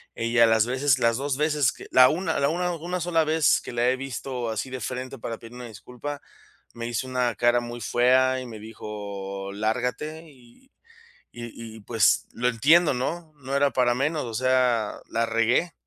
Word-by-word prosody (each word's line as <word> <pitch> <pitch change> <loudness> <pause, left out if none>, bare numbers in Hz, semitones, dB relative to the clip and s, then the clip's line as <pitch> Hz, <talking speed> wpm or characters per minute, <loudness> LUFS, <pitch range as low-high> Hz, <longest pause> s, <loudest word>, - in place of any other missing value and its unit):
Ella 115 0 +3
las 110 -1 +4
veces 130 +1 +2
las 115 0 +2
2 140 0 -2
veces 150 -3 +2
que - - -12
la 130 0 +7
una 165 -2 -1
la 140 +1 +2
una 180 +2 -1
una 175 +3 -4
sola 165 -2 +2
vez 155 0 +3
que - - -8
la 120 +1 +2
he 130 - +1
visto 130 -2 -4
así 110 +4 -3
de 130 -2 -5
frente 130 +3 -5
para 115 0 -5
pedir 115 +1 -12
una 125 -1 -8
disculpa, 125 +7 -8 0.5
me 115 0 -6
hizo 120 +2 -3
una 125 -2 0
cara 120 +1 +3
muy 120 0 -7
fea, 130 +1 +3
y 130 - -7
me 110 -3 -9
dijo: 100 -3 -7
"Lárgate". 125 +9 -2
Y 135 - -21 0.6
y 120 -1 -8 0.2
y - - -12
pues, 110 0 +2
lo 125 +1 0
entiendo, 150 +7 +4
¿no?, 160 +6 -4
no 135 0 -3
era 140 0 +3
para 125 -1 +2
menos. 145 +3 -1
O 115 -2 -6
sea, 125 -3 +1
la 115 0 0
regué, 115 +9 +1
125 Hz, 190 wpm, -25 LUFS, 115-140 Hz, 0.6 s, la